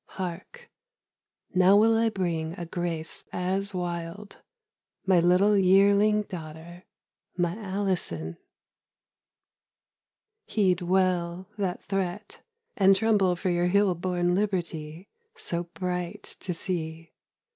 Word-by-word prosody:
Hark, 190 - -6 0.8
now 185 +2 +6
will 225 +2 +5
I 225 0 +3
bring 170 -5 -2
A 175 -2 -6
grace 165 -2 -3
as 190 +3 -2
wild, 175 +2 -5 0.6
my 185 -2 +4
little 180 +4 +4
yearling 200 +2 +4
daughter, 170 -1 -9 0.5
My 175 0 0
Alison. 185 - -2 2.1
Heed 185 -4 +1
well 180 0 0
that 185 -3 -2
threat; 195 +1 -3 0.3
And 195 -1 +5
tremble 200 -4 +2
for 180 +1 -1
your 175 0 +1
hill 200 +1 +3
born 175 0 0
liberty 175 -3 -2 0.3
So 175 - -2
bright 180 -2 -3 0.2
to 185 - -4
see! 165 -2 -3
180 Hz, 105 wpm, -27 LUFS, 175-200 Hz, 2.1 s, now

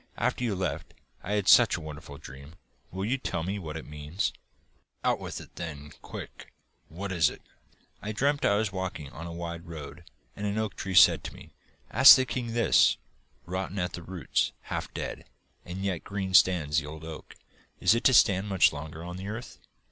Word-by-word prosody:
After - - 0
you 110 -5 0
left, 90 -1 -4 0.3
I 100 - -4
had 105 -2 0
such - - +7
a - - -6
wonderful 75 -2 -9
dream. 70 +5 -12 0.3
Will 95 +2 -4
you 130 +5 0
tell 85 -9 -3
me 100 +4 -3
what 80 -3 -6
it - - -8
means?' 75 +6 -3 0.7
'Out - - +2
with - - -6
it - - -14
then, 75 -4 -7
quick! - - -9 0.4
What 95 +4 -6
was 85 -5 +3
it?' - - -12 0.6
'I 105 - -4
dreamt 145 +6 +1
I 100 - +4
was 105 -1 0
walking 90 -7 -5
on 85 +2 -8
a - - -7
wide 85 0 -6
road, 80 +1 -9 0.3
and 105 0 -3
an 100 +1 -2
oak 110 -3 -2
tree 95 -1 -4
said - - +7
to - - -7
me: - - -14 0.4
"Ask 130 +4 +10
the 130 - +1
king 120 -2 -4
this: 115 0 +4 0.5
Rotten 95 +2 -4
at 90 -1 -2
the 85 - -6
roots, 90 +1 -1 0.2
half - - -3
dead, - - -6 0.4
and 90 +2 -6
yet 95 -4 -2
green 95 -2 -4
stands 80 -5 +4
the 75 - -8
old 80 +1 -9
oak. 80 -1 -9 0.4
Is 90 +2 +5
it 115 - 0
to 130 - +6
stand 100 -2 +4
much 95 -6 +4
longer 80 +2 -7
on 90 +1 -7
the 95 +1 -7
earth?" 110 +4 -7
90 Hz, 200 wpm, -28 LUFS, 80-100 Hz, 0.7 s, Ask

